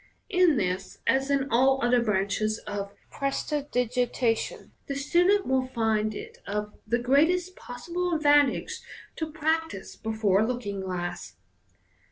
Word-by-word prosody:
In 360 -6 +4
this, 185 -2 -2
as 270 +1 +2
in 275 -1 +1
all 265 +3 +4
othei 245 -1 +3
branches 210 +1 0
of 200 -1 -4 0.2
prestidigita 250 -4 0
tion, - - -7 0.2
the 275 - -3
student 355 +8 +3
will 260 -1 +1
find 220 -3 0
it - - -9
of 210 +1 -3
the 235 +2 +2
greatest 320 +9 +2
possible 345 +8 -3
advantage 290 -3 +3 0.4
to 320 -1 -3
practise 315 -8 -2
be 220 - -4
fore 205 -3 +2
a 220 - +2
looking 215 -6 -3
glass. 175 - -4
250 Hz, 135 wpm, -27 LUFS, 210-295 Hz, 0.4 s, In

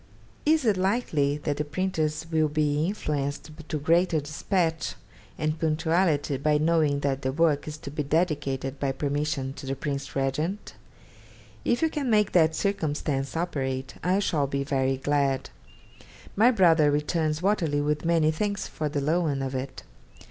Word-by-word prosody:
Is 310 -3 +4
it 210 -4 +3
likely 185 -8 +1
that 145 -1 -1
the 150 - 0
printers 155 -1 -2
will 155 -1 +3
be 150 +1 +1
influenced 150 -6 -3 0.2
to 155 - -1
greater 165 +2 +2
dispatch 160 +3 -1 0.4
and 155 0 -1
punctuality 160 -2 +1
by 150 +2 +2
knowing 155 -2 +2
that 140 -1 -1
the 130 -1 -1
work 150 0 +1
is 155 0 -5
to 140 - -8
be 150 - -2
dedicated, 145 -3 -1
by 135 -1 0
permission, 145 -1 -2
to 140 -1 -9
the 135 - -1
Prince 140 -1 -4
Regent? 150 +9 -2 0.9
If 240 +6 +1
you 320 - +3
can 280 -4 -2
make 210 -2 +3
that 160 -2 +4
circumstance 150 -7 -1
operate, 135 -6 -2
I 185 +2 +2
shall 155 -8 +1
be 140 0 -2
very 135 -1 0
glad. 140 -1 0 0.8
My 225 +5 +6
brother 170 -10 +5
returns 155 +2 0
"Waterloo" 165 -8 +1
with 150 0 -1
many 165 -2 +3
thanks 200 +4 -2
for 155 -1 -3
the 145 -1 -2
loan 150 -2 0
of 135 0 -3
it. 130 0 -5
150 Hz, 155 wpm, -26 LUFS, 140-170 Hz, 0.9 s, My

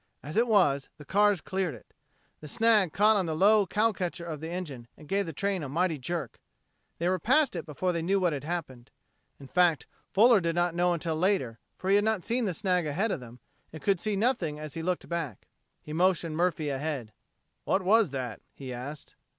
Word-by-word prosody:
As 150 - -7
it 235 +2 +3
was, 145 -11 +3
the 150 - -12
cars 205 +1 +3
cleared 185 -7 -2
it. 110 - -18 0.5
The 155 - -10
snag 215 0 +3
caught 210 +5 +4
on 185 -3 0
the 160 - -2
low 205 +3 +4
cow 220 +2 +2
catcher 175 -3 -4
of 155 -3 -5
the 160 +2 -6
engine 150 -9 -6
and 150 - -14
gave 200 +2 0
the - - -3
train 195 +4 -1
a 145 - -5
mighty 165 +1 0
jerk. 145 -2 -4 0.6
They 170 - -1
were 185 0 +1
past 265 - +3
it 170 0 -5
before 180 +5 -1
they 170 -1 -2
knew 195 +4 +1
what 175 -4 +1
had 140 -2 -4
happened. 145 -7 -5 0.5
In 140 - -11
fact, 170 +1 +2 0.3
Fuller 225 +2 +6
did 170 -2 -1
not 175 0 +1
know 175 +1 +2
until 165 -1 -2
later, 155 - 0 0.2
for 185 - -6
he 200 - +6
had 205 - +2
not 220 -4 0
seen 240 0 0
the 185 -4 -2
snag 180 -5 0
ahead 195 +10 0
of - - -2
them, 120 -1 -13 0.3
and 160 - -8
he - - -17
could 195 -3 +3
see 215 +2 -1
nothing 195 - 0
as 150 -1 -7
he 165 - -4
looked 180 +1 -2
back. 165 - -4 0.4
He 150 - -7
motioned 170 -2 +1
Murphy 165 -3 0
ahead. 135 -5 -3 0.5
"What 190 - +1
was 210 0 +4
that?" 130 -4 -5
he 130 -2 -7
asked. 140 +5 -7
175 Hz, 220 wpm, -28 LUFS, 150-195 Hz, 0.6 s, Fuller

